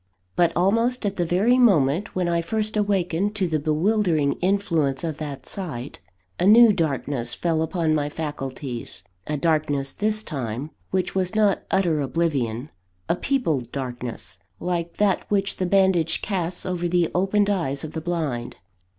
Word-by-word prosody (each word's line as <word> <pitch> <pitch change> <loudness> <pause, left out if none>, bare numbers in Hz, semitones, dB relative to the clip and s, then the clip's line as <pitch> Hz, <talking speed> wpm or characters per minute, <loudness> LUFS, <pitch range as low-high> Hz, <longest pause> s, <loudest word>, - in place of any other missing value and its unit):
But, 175 -1 +3
almost 230 +7 +2
at 200 -1 -2
the 175 -2 0
very 215 +9 +3
moment 180 - +3
when 180 -1 0
I 170 0 +1
first 215 +5 -2
awakened 200 -1 0
to 195 -3 0
the 155 -2 0
bewildering 160 -1 +1
influence 170 -8 +1
of 160 -3 -3
that 140 -4 -6
sight, 145 -9 -5 0.4
a 180 - +3
new 225 +1 +8
darkness 140 -8 -1
fell 165 +3 0
upon 160 -1 0
my 145 -1 0
faculties 135 - -5 0.2
a 150 - -1
darkness, 145 -3 0
this 215 +1 0
time, 135 - -4 0.2
which 185 -1 -1
was 190 +1 -1
not 210 -3 +3
utter 170 -6 +2
oblivion; 135 -4 -1 0.4
a - - +2
peopled 165 - -1
darkness, 125 -6 -5 0.2
like 170 -1 -3
that 205 -2 +1
which 195 -1 +1
the 185 - -1
bandage 185 -4 +2
casts 180 -3 -1
over 180 -2 -1
the 175 -1 +1
opened 200 +3 +2
eyes 140 -8 -1
of 155 - -5
the 160 - -5
blind. 150 -8 -3
170 Hz, 155 wpm, -24 LUFS, 145-195 Hz, 0.4 s, new